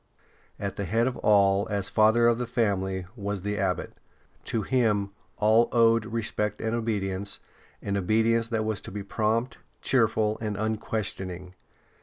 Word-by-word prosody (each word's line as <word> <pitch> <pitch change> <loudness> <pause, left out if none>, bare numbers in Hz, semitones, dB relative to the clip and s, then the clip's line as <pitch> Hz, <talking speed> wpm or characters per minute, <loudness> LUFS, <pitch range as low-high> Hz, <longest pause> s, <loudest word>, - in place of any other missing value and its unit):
At 100 -1 -4
the 100 - -2
head 115 +6 +1
of 130 -1 -1
all, 100 -1 +3
as 100 -2 -1
father 110 +3 +4
of 120 0 +2
the 125 - -2
family, 95 -6 -1
was 100 -3 -4
the 105 0 -2
Abbot. 95 -2 -1 0.5
To 110 -2 -1
him 105 -5 +1 0.3
all 110 +2 +4
owed 115 -1 +4
respect 110 -2 -2
and 110 0 -2
obedience, 100 -4 -2 0.4
an 100 - -2
obedience 115 +4 +2
that 110 -2 -1
was 110 -2 -2
to - - -9
be 100 +1 -5
prompt, 110 +4 -1 0.2
cheerful, 110 -4 +2
and 105 -2 -3
unquestioning. 100 -4 -3
110 Hz, 150 wpm, -27 LUFS, 100-115 Hz, 0.5 s, father